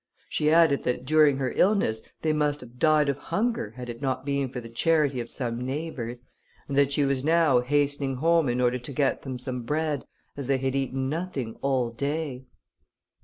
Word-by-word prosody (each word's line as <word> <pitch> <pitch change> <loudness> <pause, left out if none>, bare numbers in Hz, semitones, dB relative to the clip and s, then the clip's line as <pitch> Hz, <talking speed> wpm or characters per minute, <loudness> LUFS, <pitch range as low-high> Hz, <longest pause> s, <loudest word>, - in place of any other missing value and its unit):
She 150 - +1
added 160 -3 +5
that 125 0 -2
during 150 -1 +4
her 130 -2 -2
illness, 185 - +2 0.2
they 155 -1 +2
must 150 -1 +1
have 125 0 -13
died 155 -1 +4
of 140 -1 0
hunger, 210 - -2
had 125 -1 -6
it 120 -1 -7
not 130 -1 -2
been 140 -2 0
for 125 - -5
the 115 - -9
charity 145 +2 +1
of 120 - -5
some 120 -2 -3
neighbours, 130 -4 -4 0.4
and 140 - -3
that 140 0 +4
she 140 0 +2
was 135 -1 0
now 160 -4 +4
hastening 140 +1 0
home 165 +1 +3
in 120 +1 0
order 125 0 +2
to 125 +3 -8
get 140 +1 +1
them 130 -2 -5
some 125 0 -4
bread, 150 +2 -1 0.3
as 140 -3 -5
they 135 -1 +2
had 130 0 -1
eaten 135 -1 -1
nothing 145 -7 -3
all 130 -4 +1
day. 140 +1 -3
135 Hz, 195 wpm, -26 LUFS, 125-150 Hz, 0.4 s, added